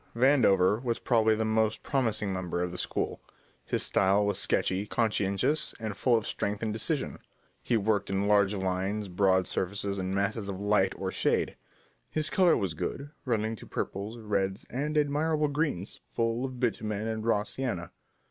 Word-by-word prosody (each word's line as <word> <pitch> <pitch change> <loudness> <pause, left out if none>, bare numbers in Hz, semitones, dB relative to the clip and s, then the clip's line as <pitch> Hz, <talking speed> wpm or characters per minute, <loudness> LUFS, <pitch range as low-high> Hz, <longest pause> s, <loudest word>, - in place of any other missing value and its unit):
Vandover 115 -6 +4
was 120 -2 0
probably 110 -3 +3
the 110 +1 -1
most 110 0 +1
promising 110 -7 0
member 90 -1 -2
of 90 - -3
the 90 - -6
school. - - -2 0.4
His - - -1
style 100 +2 +3
was 100 -2 +1
sketchy, 95 +2 0
conscientious, 110 +6 +1
and 110 -3 -4
full 120 +2 +3
of 110 - -3
strength 105 +2 -2
and 110 -1 -1
decision. 140 +7 -1 0.4
He 120 - +1
worked 105 -1 0
in 95 +1 0
large 100 -1 +4
lines, 95 +2 -2
broad 95 0 +3
surfaces 100 +2 -1
and 95 +1 -2
masses 100 +1 -1
of 95 -1 -4
light 100 -2 +2
or 95 -1 -3
shade. - - 0 0.5
His 155 +1 +1
colour 180 -3 +4
was 95 -5 -1
good, 140 - -4
running 110 -3 0
to - - -11
purples, 100 +4 -4
reds, 100 -3 -1
and 150 +5 -1
admirable 150 +1 +1
greens, 145 - -2
full 115 +2 -1
of 130 -2 -6
bitumen 110 -3 -1
and 110 -1 -3
raw 110 -2 +2
sienna. 115 -7 -3
105 Hz, 165 wpm, -29 LUFS, 95-120 Hz, 0.5 s, Vandover